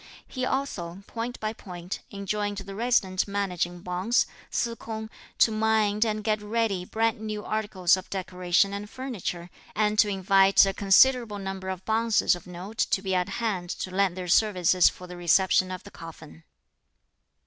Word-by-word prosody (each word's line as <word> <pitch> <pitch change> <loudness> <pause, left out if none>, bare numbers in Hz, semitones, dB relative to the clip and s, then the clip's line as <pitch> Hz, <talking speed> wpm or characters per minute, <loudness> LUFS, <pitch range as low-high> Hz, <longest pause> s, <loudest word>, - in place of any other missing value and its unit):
He 255 -1 -3
also, 195 -9 -3
point 235 +2 -5
by 215 0 -2
point, 180 -3 -7
enjoined 205 +1 -3
the 195 0 -7
resident 200 -4 +1
managing 180 -3 -2
bonze, 185 +7 +1 0.2
Se 235 - -1
K'ung, 220 -1 -7 0.3
to 225 - +5
mind 215 -1 +2
and 215 -1 -2
get 215 0 0
ready 210 -3 -1
brand 225 +2 0
new 215 -1 -5
articles 205 -5 +1
of 185 0 -9
decoration 185 +1 0
and 205 +1 -6
furniture, 200 -9 -5 0.2
and 210 0 +1
to 210 - +5
invite 195 0 +5
a 195 - -1
considerable 215 +3 +4
number 190 -1 -5
of 190 -1 -5
bonzes 225 -3 +2
of 175 - -12
note 185 +5 -9
to 190 - +1
be 190 -1 -1
at 180 +1 0
hand 195 -4 -2
to 185 - -4
lend 190 -1 +1
their 180 -1 -5
services 185 -2 +4
for 180 - -11
the 180 0 -9
reception 185 +1 +3
of 185 +1 -6
the 200 - -12
coffin. 165 -1 -12
200 Hz, 165 wpm, -26 LUFS, 185-220 Hz, 0.3 s, to